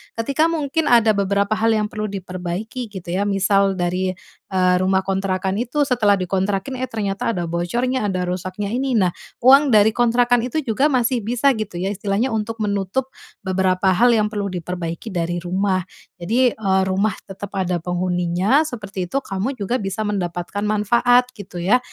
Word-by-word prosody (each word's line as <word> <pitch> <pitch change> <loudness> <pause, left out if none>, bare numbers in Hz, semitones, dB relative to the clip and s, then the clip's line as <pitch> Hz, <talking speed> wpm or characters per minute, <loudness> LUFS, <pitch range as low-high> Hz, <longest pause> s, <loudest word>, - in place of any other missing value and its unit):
Ketika 275 +8 +1
mungkin 320 -1 -1
ada 230 -2 +5
beberapa 200 0 0
hal 225 +1 +2
yang 210 -1 0
perlu 215 0 -3
diperbaiki 190 +5 -5
gitu 185 -4 -8
ya, 200 +3 0
misal 195 0 +2
dari, 185 +1 -1 0.4
eee, 185 -1 +3
rumah 190 +1 +2
kontrakan 190 +1 -1
itu 255 +5 0
setelah 235 -7 +3
dikontrakin, 195 +6 -2
eh 255 - -2
ternyata 225 0 -2
ada 175 - -2
bocornya, 235 +8 -1
ada 185 -2 -1
rusaknya 185 +3 -3
ini, 260 +2 -1
nah 185 -3 +3 0.3
uang 270 +1 +6
dari 210 0 +6
kontrakan 240 0 +3
itu 305 +5 -2
juga 265 +2 0
masih 250 -1 +1
bisa 245 +5 +2
gitu 215 -5 -5
ya, 190 - -1
istilahnya 205 +5 -1
untuk 225 0 -3
menutup 205 +6 -1 0.3
beberapa 190 0 +1
hal 235 +6 +4
yang 215 -2 +2
perlu 205 -1 -3
diperbaiki 175 +2 -5
dari 175 0 -2
rumah. 185 +2 0 0.4
Jadi, 235 +7 +2
eee, 190 -3 +1
rumah 190 +2 0
tetap 195 0 -8
ada 185 -2 0
penghuninya, 180 - +1
seperti 205 -9 -5
itu, - - -1
kamu 200 +8 -3
juga 220 +5 -1
bisa 195 +2 -3
mendapatkan 185 -1 -3
manfaat 240 +4 +3
gitu 185 -3 -9
ya. 215 +8 +3
205 Hz, 165 wpm, -21 LUFS, 185-235 Hz, 0.4 s, uang